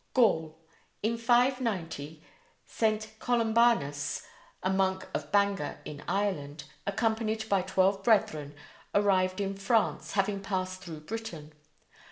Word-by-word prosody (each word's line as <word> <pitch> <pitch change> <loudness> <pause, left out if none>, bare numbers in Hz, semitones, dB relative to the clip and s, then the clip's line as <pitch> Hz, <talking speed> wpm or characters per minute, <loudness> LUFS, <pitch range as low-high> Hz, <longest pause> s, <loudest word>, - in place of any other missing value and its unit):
GAUL: 160 -10 +3 0.5
In 225 +2 +1
590 230 - 0 0.4
St. 215 -1 0
Columbanus, 225 -12 +2 0.4
a 185 - +1
monk 190 0 +1
of - - -4
Bangor 200 -6 +1
in 145 -1 -7
Ireland, 165 -7 -1 0.2
accompanied 220 +1 0
by 200 -3 +3
twelve 190 +1 +2
brethren, 155 -10 +2 0.4
arrived 190 -2 +3
in 195 -1 -1
France, 205 +3 0
having 200 0 +1
passed 185 -1 -3
through 165 -5 -8
Britain. 165 -5 -6
195 Hz, 110 wpm, -30 LUFS, 165-220 Hz, 0.5 s, GAUL